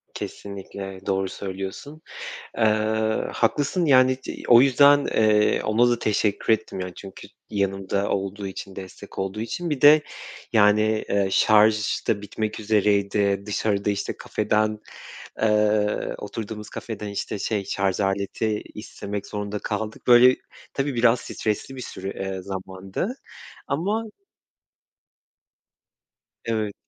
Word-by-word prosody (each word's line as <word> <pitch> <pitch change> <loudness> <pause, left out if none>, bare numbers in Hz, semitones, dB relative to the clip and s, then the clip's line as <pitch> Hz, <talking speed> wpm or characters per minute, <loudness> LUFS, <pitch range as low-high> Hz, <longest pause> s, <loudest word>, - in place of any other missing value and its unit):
Kesinlikle 95 -1 -7
doğru 95 0 0
söylüyorsun. 95 +12 -7 0.6
Iıı, 110 0 +1
haklısın, 145 +9 +1
yani, 130 -3 +5
c - - -7
o 120 0 +8
yüzden, 140 +2 +5
eee, 105 -1 +3
ona 115 +3 +3
da 120 -1 +1
teşekkür 105 0 +1
ettim, 110 -3 -3
yani, 90 -1 -5
çünkü 95 -1 -10 0.2
yanımda 100 -1 -1
olduğu 100 +1 -2
için, 95 0 -8
destek 95 +1 -9
olduğu 95 +2 -3
için. 170 +10 -4
Bir 145 -4 -2
de, 150 +1 +8 0.5
yani, 110 +1 +3
eee, 100 -1 +2
şarj 105 +1 +3
da 100 - +1
bitmek 105 +1 -4
üzereydi. 100 -1 +2
Dışarıda, 105 -1 0
işte, 100 0 -2
kafeden, 105 0 0 0.6
eee, 105 -1 +2
oturduğumuz 105 0 -6
kafeden, 110 -2 -6
işte, 100 +1 -4
şey, 100 -2 -2
şarj 95 -1 -1
aleti 100 +2 -1
istemek 105 -1 -6
zorunda 105 0 -4
kaldık. 110 +1 -5
Böyle, 125 +1 +7 0.4
tabii 135 -1 -1
biraz 120 0 +4
stresli 110 +5 -3
bir 130 - -7
süre 95 -3 -6
ııı, 95 -1 -5
zamandı 95 - -5 0.5
ama 195 +11 -1 2.4
Evet. 110 -3 -1
105 Hz, 120 wpm, -24 LUFS, 100-115 Hz, 2.4 s, o